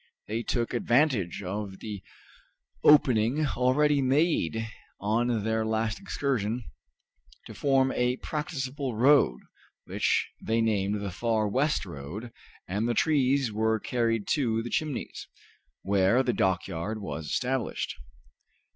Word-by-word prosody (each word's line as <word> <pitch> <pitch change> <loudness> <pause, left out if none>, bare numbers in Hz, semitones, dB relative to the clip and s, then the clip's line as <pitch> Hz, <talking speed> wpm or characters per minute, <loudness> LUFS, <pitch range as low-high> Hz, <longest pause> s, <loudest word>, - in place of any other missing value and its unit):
They 110 +2 -2
took 120 0 -2
advantage 120 - +1
of 95 +1 -4
the 105 -2 -7 0.8
opening 140 -1 +5
already 140 +3 +2
made 130 - +1 0.3
on 110 +2 0
their 110 0 0
last 110 0 -1
excursion 125 - -2 0.8
to - - -9
form 135 -1 +2
a 125 0 +1
practicable 140 -4 -4
road, 125 - +4 0.5
which - - 0
they 115 +1 0
named 105 -2 0
the 100 -2 -4
Far 110 +2 0
West 135 +2 0
Road, 90 +8 -7 0.4
and 105 +6 -1
the 120 - 0
trees 140 -4 +2
were 110 +1 +1
carried 115 -2 0
to 115 -7 +1
the 120 - -6
Chimneys, 155 -4 -3 0.6
where 100 +6 +3
the 125 - 0
dockyard 95 +2 -1
was 80 -6 -5
established. 125 - -2
115 Hz, 120 wpm, -28 LUFS, 105-130 Hz, 0.8 s, opening